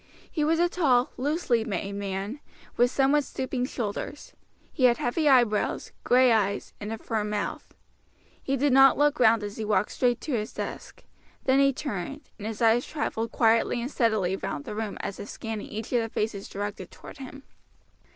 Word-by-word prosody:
He 310 - -1
was 320 +2 +2
a 350 - +4
tall, 270 -9 +2
loosely 265 -4 0
made 200 -2 -3
man, 200 +5 -4 0.4
with 245 +1 +4
somewhat 275 +3 +3
stooping 260 -1 -3
shoulders; 240 +4 -5 0.4
he 255 - +2
had 240 -1 +5
heavy 295 +5 +1
eyebrows, 240 -6 +2
gray 250 0 +5
eyes, 200 -3 0
and 210 +1 -5
a 225 - -3
firm 215 -1 -2
mouth. 210 -1 -4 0.7
He 275 0 -1
did 280 0 +2
not 270 0 +7
look 295 0 +2
round 225 -2 +5
as 205 0 -6
he 220 - -3
walked 210 0 +1
straight 245 -2 +1
to 305 - -5
his 215 -2 -2
desk; - - -7 0.4
then 265 +1 +3
he 275 0 +5
turned, 270 - -5 0.2
and 210 - -5
his 220 +1 -3
eyes 230 +2 +4
traveled 230 -6 -3
quietly 230 +1 +3
and 245 +4 -4
steadily 215 -8 +1
round 145 - -5
the - - -5
room 215 -1 -4
as 200 - -5
if 205 - -7
scanning 225 -2 -5
each 220 +3 -6
of 240 - +3
the 225 - -3
faces 210 -2 -3
directed 200 -2 -5
toward - - -13
him. 270 +1 -9
235 Hz, 185 wpm, -27 LUFS, 210-270 Hz, 0.7 s, not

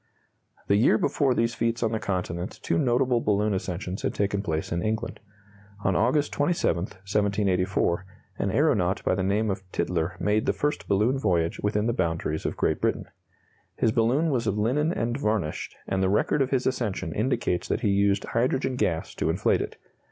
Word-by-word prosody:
The 100 - +3
year 110 0 +4
before 135 +1 +1
these 115 0 +1
feats 115 0 -1
on 110 - +1
the 110 - -1
Continent 90 -3 -3
two - - +1
notable 125 -2 +2
balloon 105 0 +1
ascensions 95 0 -3
had - - -2
taken 100 0 0
place 80 -5 -3
in 85 - 0
England. 110 +3 -2 0.6
On 95 - +2
August 135 +8 +2
27, 145 - +1
1784, 95 -3 0 0.4
an 100 - 0
aeronaut 100 - +2
by - - +2
the 95 - 0
name 100 +3 +1
of 95 0 -4
Tytler 90 +1 -1
made 105 +1 +1
the - - +3
first 145 0 -2
balloon 110 +7 +2
voyage 85 -8 0
within 105 +1 0
the 120 - +1
boundaries 80 -5 -1
of - - -4
Great - - 0
Britain. - - -1 0.7
His 110 - +2
balloon 125 +8 +2
was 120 -4 0
of 105 0 0
linen 135 +9 +1
and 120 -3 -2
varnished, 105 - -2
and 95 0 0
the 95 - +2
record 105 +8 +2
of 130 - +1
his 130 -2 0
ascension 105 -10 -1
indicates 105 -6 0
that - - -1
he 110 - +1
used 100 0 +2
hydrogen 130 +2 0
gas 80 -7 -1
to - - -1
inflate - - +2
it. - - -6
105 Hz, 180 wpm, -26 LUFS, 95-120 Hz, 0.7 s, year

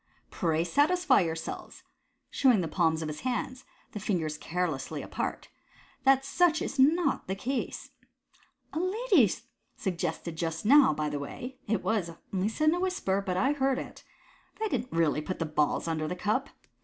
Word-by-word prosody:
Pray 165 -2 0
satisfy 290 - +3
yourselves 160 -2 -5 0.2
" - - -48
(showing 250 -8 +4
the 165 - -2
palms 160 -1 +1
of - - -3
his 150 0 -5
hands, 255 +1 -3 0.3
the 210 - -5
fingers 170 -7 -1
carelessly 160 -4 -3
apart) - - -4 0.6
"that 270 0 +5
such 330 +1 +3
is 275 - -4
not 320 +6 +3
the 190 - -2
case. 255 +7 -3 0.8
A 315 - -1
lady 370 - +3 0.4
suggested 170 -2 -3
just 165 +2 -3
now, 280 - +7
by 150 0 -1
the 145 -1 -3
way 250 - -7
— - - -34
it 215 -1 0
was 205 -7 0 0.2
only 190 +2 +1
said 310 +7 +2
in - - +3
a 350 - -1
whisper, 360 - 0
but 180 -2 -2
I 265 +8 +3
heard 270 -2 +1
it - - -7 0.3
— - - -31
that 440 - -1
I - - -1
didn't 255 - -2
really 160 -3 +2
put 185 +4 -4
the 165 - -1
balls 150 +1 0
under 155 -1 -1
the 180 - -3
cup. 215 +8 -1
195 Hz, 180 wpm, -29 LUFS, 165-270 Hz, 0.8 s, now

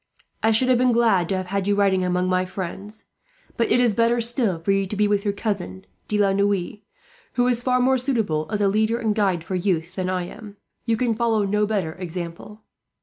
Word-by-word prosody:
I 220 - +3
should 225 +3 +2
have 250 -2 +4
been 250 -1 +3
glad 220 -7 +2
to 190 - 0
have 185 - -3
had 195 +1 -2
you 205 - +2
riding 195 -2 +2
among 180 0 0
my 185 0 +1
friends; 195 +3 -7 0.5
but 230 - 0
it - - +4
is 240 -3 +3
better 235 +2 +2
still 230 -5 0
for 165 +4 -1
you 195 0 +1
to 210 - -5
be 210 +1 +2
with 205 -1 +1
your 205 - +1
cousin, 190 - -4 0.2
De 210 - 0
la 200 -2 +3
Noue, 200 0 0 0.5
who 245 0 +2
is 245 -1 +1
far 250 0 +1
more 260 +1 +3
suitable 220 - -1
as 210 - -2
a 200 - +3
leader 220 +3 +1
and 220 -3 0
guide 195 -6 0
for 185 - -6
youth 175 -2 -1
than 185 -1 -3
I 185 -1 -1
am. 205 +3 -10 0.3
You 225 -1 +2
can 240 0 +1
follow 225 -2 +1
no 210 +1 +1
better 195 -7 -1
example. 180 +4 -7
205 Hz, 225 wpm, -23 LUFS, 185-225 Hz, 0.5 s, have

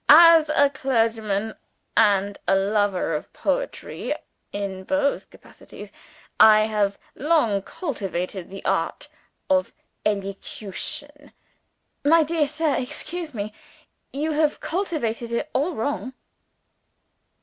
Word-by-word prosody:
As 325 0 +9
a 285 -2 +4
clergyman 225 -5 0 0.4
and 200 -2 +3
a - - +4
lover 195 -3 +1
of 150 - -4
poetry - - -2 0.4
(in 195 -2 -4
both 285 +5 0
capacities) - - -13 0.5
I 215 -1 +8
have 210 -2 0 0.2
long 270 -10 +2
cultivated 190 - -4
the 195 +1 -9
art - - -1 0.4
of 280 -1 +1 0.3
elocution 210 +8 -4 0.4
" - - -49
"My 330 -1 +7
dear 310 -1 +1
sir, 305 0 0
excuse 305 +3 -4
me, 210 0 -4 0.6
you 300 +3 -2
have 305 0 +1
cultivated 280 - -2
it 290 +6 -2
all 300 +5 0
wrong!" 260 +2 -2
235 Hz, 105 wpm, -24 LUFS, 205-300 Hz, 0.6 s, As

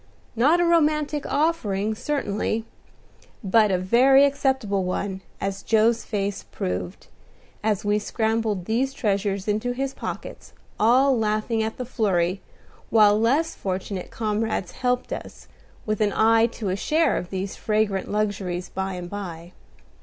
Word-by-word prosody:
Not 290 +9 +4
a 350 - +3
romantic 305 -3 +2
offering, 220 -10 0
certainly, 220 -3 -2 0.8
but 210 +2 +4
a 185 - +2
very 255 +9 +5
acceptable 265 -8 0
one, 190 +1 -3 0.2
as 195 0 -3
Joe's 225 +2 +2
face 200 -2 -2
proved, 90 -1 -5 0.6
as 210 -2 0
we 205 0 +2
scrambled 220 -3 -1
these 260 +6 0
treasures 200 -2 -1
into 215 +4 0
his 270 +1 -3
pockets, - - -7 0.3
all 255 +5 +4
laughing 220 0 0
at 220 0 -3
the 250 - -4
flurry, 190 -6 0 0.5
while 210 -1 +5
less 285 +9 +2
fortunate 190 0 -4
comrades 215 -4 -2
helped 250 -1 -1
us, - - -9 0.4
with 215 0 -1
an 205 -2 +2
eye 225 +1 +5
to 220 -3 -5
a 185 - 0
share 310 +9 +1
of 175 - -4
these 190 0 -4
fragrant 210 -3 0
luxuries 195 -4 -2
by 190 0 -3
and 180 -1 -6
by. 175 -3 -7
215 Hz, 140 wpm, -24 LUFS, 195-245 Hz, 0.8 s, very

